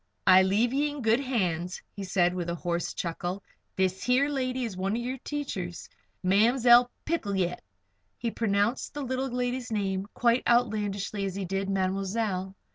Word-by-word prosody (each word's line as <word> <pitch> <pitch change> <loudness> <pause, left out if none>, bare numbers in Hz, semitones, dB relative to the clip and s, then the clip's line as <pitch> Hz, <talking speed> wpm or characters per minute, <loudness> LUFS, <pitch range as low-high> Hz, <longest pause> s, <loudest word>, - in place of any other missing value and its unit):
"I 185 0 +8
leave 210 +6 +2
ye 290 +2 +2
in 290 -3 -6
good 225 +2 +4
hands," 180 -10 -1 0.2
he 200 - -5
said, 180 -2 +2
with 175 -2 -3
a 170 - -1
hoarse 175 0 -2
chuckle. 175 +3 -3 0.3
"This 190 0 0
here 255 +3 +3
lady 260 -2 -1
is 215 -5 -5
one 190 +2 -1
o' 230 - 0
yer 250 +2 -3
teachers, 195 - -4 0.4
Ma'mzell 240 +5 +5 0.2
Picolet." 200 - -1 0.6
He 230 -1 -2
pronounced 215 +4 0
the 290 - -3
little 260 +1 -2
lady's 245 0 -2
name 195 -2 -1
quite 235 +1 +3
as 240 - +6
outlandishly 205 -3 -3
as 190 -1 -4
he 195 -1 -3
did 195 +2 -2
"mademoiselle." 195 0 -1
205 Hz, 165 wpm, -28 LUFS, 190-245 Hz, 0.6 s, I